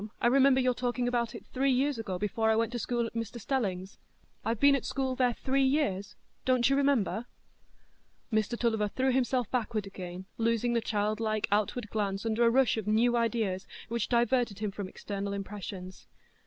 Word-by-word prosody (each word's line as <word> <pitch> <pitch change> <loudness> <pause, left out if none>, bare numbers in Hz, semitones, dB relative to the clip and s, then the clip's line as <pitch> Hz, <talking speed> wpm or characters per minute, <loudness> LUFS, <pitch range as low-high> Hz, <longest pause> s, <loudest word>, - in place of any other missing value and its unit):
"I - - -1
remember 265 +2 +5
your 255 -1 +2
talking 245 0 -1
about 235 -2 -1
it - - -9
three 270 +1 0
years 265 0 +1
ago, 195 -5 -3
before 215 +3 0
I 220 - +4
went 230 +1 +1
to 240 - -3
school 240 +1 -1
at 230 - -6
Mr 230 0 -4
Stelling's. 195 -6 -2 0.4
I've 225 -1 -1
been 280 0 +6
at 275 - +1
school 265 -1 -1
there 250 -1 +2
three 270 +1 0
years; 265 -9 +1 0.3
don't 255 -2 +3
you 275 - +3
remember?" 255 -5 +1 1.1
Mr 220 +2 +1
Tulliver 220 -3 +1
threw 260 +5 0
himself 250 -2 0
backward 225 -4 -1
again, 185 -1 -7
losing 230 +1 +1
the 235 - +2
childlike 215 0 0
outward 210 +1 0
glance 200 -1 -2
under 225 +1 +1
a 230 - +6
rush 255 -1 +3
of 215 -2 -4
new 230 +3 +3
ideas, 220 -5 0 0.2
which 235 -1 -1
diverted 240 -3 +2
him 210 -1 -2
from 195 -1 -5
external 200 0 -5
impressions. 195 -2 -7
230 Hz, 180 wpm, -30 LUFS, 210-250 Hz, 1.1 s, been